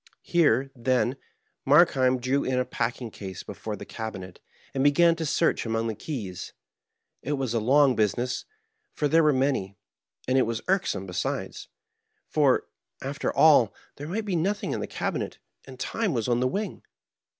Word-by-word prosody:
Here, 145 -6 +2
then, 125 +1 +1 0.5
Markheim 130 -1 +4
drew 130 +3 0
in 130 -1 0
a 125 - +1
packing 120 -1 -3
case 95 -3 -8
before 110 -1 -6
the - - -9
cabinet, 95 -5 -7 0.3
and 135 - 0
began 165 +4 +5
to 160 -2 -2
search - - +1
among 115 0 -1
the 115 - -1
keys. 105 - -6 0.7
It 145 - -2
was 135 -4 -2
a 115 - +2
long 135 +3 +4
business, 120 +4 0 0.5
for 150 - +1
they 165 +3 +4
were 155 -1 +4
many; 130 -8 0 0.5
and 130 +1 +3
it 130 - +2
was 115 -1 -3
irksome, 185 - 0
be 90 - -9
sides; - - -3 0.6
for, - - +2 0.4
after - - -2
all, - - +5 0.2
there 145 - -7
might 210 +6 -3
be 195 -4 -1
nothing 195 +5 -1
in - - -2
the - - -4
cabi - - -2
net, - - -5 0.3
and 130 -1 -12
time 205 - -1
was 115 -3 -1
on 120 -1 +2
the 130 - +2
wing. 200 +8 -3
130 Hz, 170 wpm, -26 LUFS, 115-145 Hz, 0.7 s, began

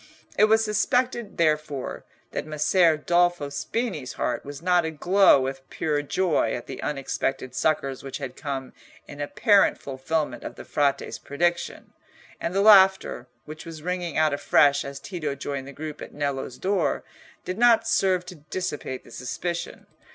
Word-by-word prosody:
It 215 - +6
was 220 +1 +4
suspected, 240 +1 0
therefore, 155 -4 -1 0.3
that - - -4
Messer 155 +2 +3
Dolfo 175 -2 +1
Spini's 150 - -3
heart 125 - -2
was 145 0 -8
not 180 +1 +3
aglow 175 +2 +4
with 135 0 -3
pure 150 -2 -1
joy 155 -6 +1
at 120 - -6
the 135 - -7
unexpected 135 -2 -2
succours 135 -3 0
which 135 -1 -6
had 130 -3 -6
come 135 -3 -5 0.3
in 145 0 -8
apparent 200 - +3
fulfilment 140 +3 -3
of - - -7
the - - -10
Frate's 140 -1 0
prediction, 170 +4 -2 0.5
and 170 - -3
the 195 - +3
laughter, 190 - +5 0.2
which 155 +1 -9
was 160 -2 -9
ringing 180 -2 -3
out 155 -1 +3
afresh 145 0 +3
as 140 0 -7
Tito 155 -8 -4
joined 140 -1 -5
the - - -8
group 150 +2 -7
at - - -9
Nello's 140 -3 -3
door, 195 +1 0 0.4
did 185 +3 -4
not 230 -2 +5
serve 185 -4 +2
to 180 - -8 0.2
dissipate 150 -8 -4
the - - -17
suspicion. 170 +7 -5
155 Hz, 155 wpm, -25 LUFS, 140-185 Hz, 0.5 s, It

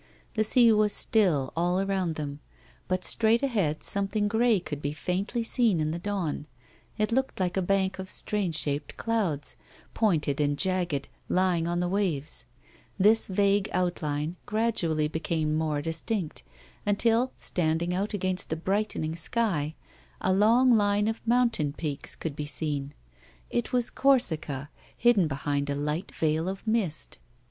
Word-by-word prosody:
The 215 - +2
sea 235 +1 +5
was 210 -1 +3
still 170 - +2
all 175 +2 +1
around 190 -4 0
them, 145 -2 -5 0.5
but 185 -1 0
straight 230 +2 +2
ahead 195 - 0
some 200 0 0
thing 205 +1 0
grey 225 0 +3
could 150 -5 -6
be 145 0 -2
faintly 190 +9 -2
seen 225 -6 +2
in 155 0 0
the 170 - -3
dawn; 175 -6 -3 0.5
it 215 +1 0
loolced 265 -1 0
like 180 -1 0
a 190 - +1
bank 190 +1 0
of 190 0 -6
strange 195 -6 -1
shaped 145 -1 -2
clouds, 195 -11 -1 0.4
pointed 155 -9 +1
and 145 0 +1
jagged, 175 -6 0 0.2
lying 180 -2 +2
on 175 +1 0
the 180 - 0
waves. 165 -10 -1 0.5
This 215 +3 +4
vague 200 +1 +2
outline 165 -2 -1
gradually 185 -9 +1
became 160 0 -1
more 155 -2 -1
distinct, 165 +2 -3 0.4
until, 230 +4 +2
standing 170 +1 -1
out 195 +3 -1
against 185 -2 -1
the 160 - 0
brightening 190 -3 -1
sky, 165 -4 -1 0.4
a 185 - +1
long 230 +6 +5
line 205 -2 +3
of 225 0 -2
mountain 230 -12 +2
peaks 150 -2 -4
could 160 -4 -5
be 150 0 -4
seen. 145 -2 -3 0.6
It 240 -1 -1
was 245 -1 0
Corsica, 160 - +2 0.3
hidden 235 -8 +4
behind 140 0 -2
a 140 - 0
light 150 +5 -2
veilof 165 +6 -1
mist. 215 -9 -1
180 Hz, 150 wpm, -28 LUFS, 155-210 Hz, 0.6 s, sea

